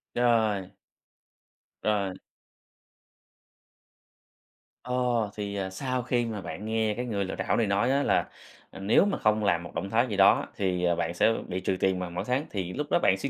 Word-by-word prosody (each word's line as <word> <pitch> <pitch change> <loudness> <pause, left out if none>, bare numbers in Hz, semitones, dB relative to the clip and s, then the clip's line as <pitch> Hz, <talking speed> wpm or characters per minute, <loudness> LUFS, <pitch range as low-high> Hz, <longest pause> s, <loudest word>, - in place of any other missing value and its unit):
Rồi. 110 -6 +2 1.1
Rồi. 100 -3 0 2.7
Ờ, 125 - -4 0.4
thì, 100 -1 -4
à, 95 -1 -2
sau 125 +6 -2
khi 120 -1 0
mà 110 -3 -4
bạn 105 - -7
nghe 110 -1 0
cái 125 +3 -4
người 100 -4 -1
lừa - - -4
đảo - - 0
này 115 -3 +2
nói 100 +6 +2
á 140 +1 +2
là, - - +1 0.4
à, - - -10
nếu 100 - +4
mà 200 - 0
không 110 0 +2
làm 85 -4 +2
một 85 - -11
động 100 - -3
thái 120 +4 +2
gì 100 - -3
đó, 95 - +5
thì, 90 -2 -1
à, 85 -1 +3
bạn 85 0 -2
sẽ 110 +6 +3
bị 90 +1 -3
trừ 95 0 -1
tiền 95 -1 +1
vào 90 -1 -4
mỗi 85 - -4
tháng, 130 +4 0
thì 90 -3 -3
lúc 145 +1 -3
đó - - +4
bạn 95 - +3
suy 140 - -2
105 Hz, 195 wpm, -28 LUFS, 95-120 Hz, 2.7 s, đó